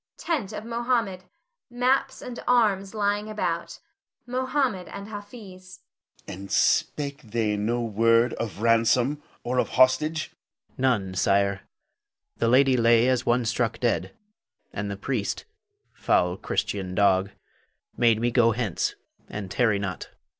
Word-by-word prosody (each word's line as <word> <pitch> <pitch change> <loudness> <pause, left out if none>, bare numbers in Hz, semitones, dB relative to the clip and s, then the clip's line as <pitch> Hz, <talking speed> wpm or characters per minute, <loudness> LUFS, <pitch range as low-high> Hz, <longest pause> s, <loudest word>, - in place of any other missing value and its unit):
[Tent 275 - -2
of 215 0 -7
Mohammed; 230 -6 -1 0.4
maps 255 +2 0
and 250 -1 -7
arms 210 -5 +2
lying 205 0 0
about. 215 0 -3 0.5
Mohammed 255 -5 -1
and 200 +1 -8
Hafiz.] 205 -3 -11 0.5
Moh'd. - - -6
And 100 -1 -9
spake 140 +6 +1
they 110 -2 -1
no 115 +4 -1
word 115 +2 +3
of 110 -1 -5
ransom 115 +5 +3 0.2
or 125 +1 -1
of - - 0
hostage? 150 +5 +3
Hafiz. - - -33
None, 115 -8 +1
sire. 100 +1 +1 0.8
The 115 - +1
lady 130 +2 +5
lay 115 0 +4
as 130 -1 0
one 120 0 +2
struck 115 0 -1
dead; 120 -2 0 0.6
and 105 +1 -3
the 100 - -5
priest, 110 -1 -3 0.5
foul 90 0 +1
Christian 95 -1 -3
dog, 95 -1 +3 0.7
bade 115 -2 +3
me 120 +1 0
go 115 -1 +4
hence, 110 -6 -2 0.3
and 100 -3 -6
tarry 115 -5 +2
not. 95 -3 -5
125 Hz, 130 wpm, -25 LUFS, -, 0.8 s, lady